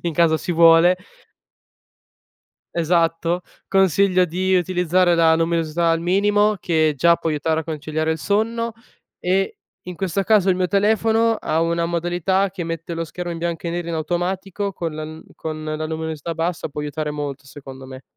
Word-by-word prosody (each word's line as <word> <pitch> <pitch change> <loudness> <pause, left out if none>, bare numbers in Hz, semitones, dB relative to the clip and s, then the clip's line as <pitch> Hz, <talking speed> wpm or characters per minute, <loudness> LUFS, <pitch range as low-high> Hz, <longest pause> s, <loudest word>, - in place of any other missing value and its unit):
in 170 -3 -2
caso 160 -1 +3
si 180 - -5
vuole 165 +2 +6 1.8
esatto, 170 +1 +1 0.3
consiglio 190 -1 +3
di 185 +2 0
utilizzare 180 0 +2
la 165 -1 +5
luminosità 165 0 0
al 165 - +1
minimo, 205 +4 +2
che 155 -3 +1
già 170 +5 +4
può 165 - -3
aiutare 160 +1 0
a - - -8
conciliare 155 0 -2
il 160 - -4
sonno; 230 +5 -1 0.4
e, 190 +2 0 0.3
in 180 -1 -7
questo 190 0 -1
caso, 200 -2 +3
il 185 - +3
mio 180 -1 0
telefono 220 +3 +2
ha 160 -6 -1
una 170 0 0
modalità 175 +3 0
che 185 -2 -6
mette 165 0 -5
lo 165 - -2
schermo 175 +2 -5
in 165 - -6
bianco 170 0 -3
e - - -1
nero 175 0 -4
in 170 - -2
automatico, 180 +5 -2
con 165 -3 -4
la 155 - -5
n 155 +1 -9
con 155 -1 -6
la 155 0 -3
luminosità 160 0 -4
bassa 165 +1 -2
può 150 - -6
aiutare 150 +1 -3
molto, 145 -2 -5
secondo 135 -1 -11
me. 130 0 -10
170 Hz, 170 wpm, -21 LUFS, 160-185 Hz, 1.8 s, vuole